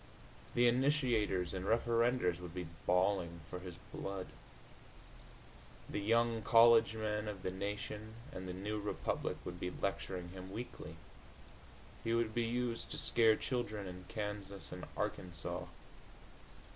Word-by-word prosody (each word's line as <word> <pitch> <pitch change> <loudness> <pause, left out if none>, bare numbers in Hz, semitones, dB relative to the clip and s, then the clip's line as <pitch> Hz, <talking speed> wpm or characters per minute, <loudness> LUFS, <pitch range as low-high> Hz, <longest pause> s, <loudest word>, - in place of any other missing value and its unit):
The 120 0 +6
initiators 120 - +2
and 95 -1 -2
referendors 115 -3 +3
would 90 -1 -8
be 90 -1 -2 0.2
bawling 90 -2 +2
for 90 - -3
his 90 -1 -7 0.2
blood. 95 -1 -3 1.6
The - - -2
young 115 +2 +3
college 115 0 +7
men 105 -1 -1
of 100 -3 -5
the 95 - -1
Nation 105 +3 -4 0.2
and 95 0 -6
the - - -3
New 105 +3 -2
Republic 105 0 -1
would 90 0 -5
be 90 - -1
lecturing 90 -1 -2
him 95 +1 -8
weekly. 120 +5 -6 1.1
He 115 0 +2
would 115 -2 +1
be 120 - +1
used 120 0 -1
to - - -4
scare 110 -2 +5
children 110 -6 -2
in 90 0 -7
Kansas 105 -2 -4
and - - -6
Arkansas. 85 -3 -3
105 Hz, 130 wpm, -36 LUFS, 90-115 Hz, 1.6 s, college